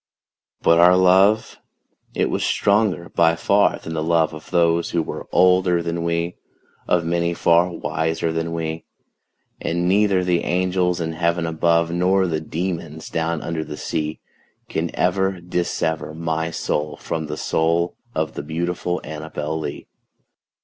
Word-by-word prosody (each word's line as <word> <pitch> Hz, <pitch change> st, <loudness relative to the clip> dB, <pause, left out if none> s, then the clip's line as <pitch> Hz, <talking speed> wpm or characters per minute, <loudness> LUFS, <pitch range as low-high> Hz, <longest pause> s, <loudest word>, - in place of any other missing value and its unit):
But 85 Hz, 0 st, +5 dB
our 90 Hz, +1 st, +7 dB
love 95 Hz, +4 st, +4 dB, 0.6 s
it -, -, +1 dB
was -, -, -1 dB
stronger 100 Hz, -4 st, +1 dB
by 85 Hz, 0 st, +3 dB
far 100 Hz, +4 st, +2 dB
than 80 Hz, -, -7 dB
the 80 Hz, -, -2 dB
love 80 Hz, -1 st, +2 dB
Of 80 Hz, -, -10 dB
those 85 Hz, -1 st, +2 dB
who 85 Hz, -2 st, 0 dB
were -, -, -7 dB
older 90 Hz, -1 st, +4 dB
than 85 Hz, 0 st, -2 dB
we 85 Hz, +1 st, -1 dB, 0.5 s
Of 85 Hz, -2 st, +2 dB
many 85 Hz, 0 st, 0 dB
far 85 Hz, +2 st, +3 dB
wiser 80 Hz, -1 st, -2 dB
than 80 Hz, 0 st, -2 dB
we 80 Hz, -1 st, -3 dB, 0.8 s
And 85 Hz, +1 st, -1 dB
neither 100 Hz, -1 st, +3 dB
the 90 Hz, -1 st, +2 dB
angels 90 Hz, 0 st, 0 dB
in 80 Hz, -1 st, -2 dB
heaven 85 Hz, 0 st, 0 dB
above, 85 Hz, +1 st, +1 dB
Nor 95 Hz, +2 st, +2 dB
the 80 Hz, -3 st, -1 dB
demons 80 Hz, -1 st, -4 dB
down 80 Hz, 0 st, -2 dB
under 80 Hz, -1 st, -3 dB
the 75 Hz, -1 st, -8 dB
sea, 75 Hz, 0 st, -3 dB, 0.5 s
Can 80 Hz, +1 st, -1 dB
ever 95 Hz, +1 st, +1 dB
dissever 85 Hz, -3 st, -2 dB
my 80 Hz, 0 st, -2 dB
soul 75 Hz, -2 st, -2 dB
from 80 Hz, -1 st, -4 dB
the 75 Hz, +1 st, -5 dB
soul 85 Hz, +3 st, 0 dB, 0.2 s
Of 80 Hz, 0 st, -1 dB
the -, -, -5 dB
beautiful 85 Hz, +3 st, -2 dB
ANNABEL 80 Hz, 0 st, -4 dB
LEE. 70 Hz, -2 st, -6 dB
85 Hz, 150 wpm, -21 LUFS, 80-90 Hz, 0.8 s, our